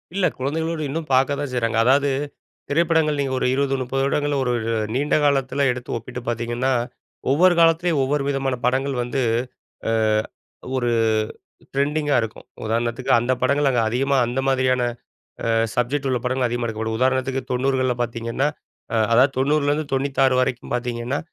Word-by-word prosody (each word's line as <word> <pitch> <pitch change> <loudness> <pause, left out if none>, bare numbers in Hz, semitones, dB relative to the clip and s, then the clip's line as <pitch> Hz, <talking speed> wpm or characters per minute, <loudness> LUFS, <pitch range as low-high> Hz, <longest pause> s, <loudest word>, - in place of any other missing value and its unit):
இல்ல, 195 -2 +2
குழந்தைகளோடு 160 +4 -2
இன்னும் 155 +1 -4
பாக்க 135 +2 +3
தான் 145 -2 -3
செய்றாங்க. 115 -2 0
அதாவது, 140 +2 +4 0.6
திரைப்படங்கள் 160 -1 +2
நீங்க 135 -1 -1
ஒரு - - 0
20 135 0 +1
30 130 +2 -2
வருடங்கள்ல, 145 +1 0
ஒரு 125 - 0
ஒரு 115 0 -2 0.2
நீண்ட 145 +2 +1
காலத்துல 140 0 +2
எடுத்து 125 -1 -5
ஒப்பிட்டு 125 +2 -7
பாத்தீங்கன்னா, 120 +3 -1 0.6
ஒவ்வொரு 175 +6 +5
காலத்துலயும், 165 -2 +3
ஒவ்வொரு 140 +1 0
விதமான 135 -2 0
படங்கள் 135 +2 +1
வந்து, 130 +2 -2 0.7
அ - - +1 0.8
ஒரு 120 -2 0 0.8
ட்ரெண்டிங்கா 145 +1 +1
இருக்கும். 115 -1 -6 0.2
உதாரணத்துக்கு 120 +4 -1
அந்த 120 +2 0
படங்கள் 140 +2 +2
அங்க 120 -3 +2
அதிகமா, 135 +4 +1
அந்த 125 +2 -2
மாதிரியான 130 -1 +2 0.6
அ - - 0 0.3
சப்ஜெக்ட் 135 +3 0
உள்ள 125 -2 +1
படங்கள், 125 0 +1
அதிகமா 120 0 -2
எடுக்கப்படும். 110 0 -3
உதாரணத்துக்கு, 130 0 +1
90கள்ல 130 0 +1
பாத்தீங்கன்னா, 115 +3 -2 0.5
அ - - +1 0.2
அதாவது 130 +4 +5
90லருந்து 145 +2 +1
96 135 -1 +2
வரைக்கும் 125 -1 -2
பாத்தீங்கன்னா, 120 +2 -2
130 Hz, 145 wpm, -22 LUFS, 125-145 Hz, 0.8 s, ஒவ்வொரு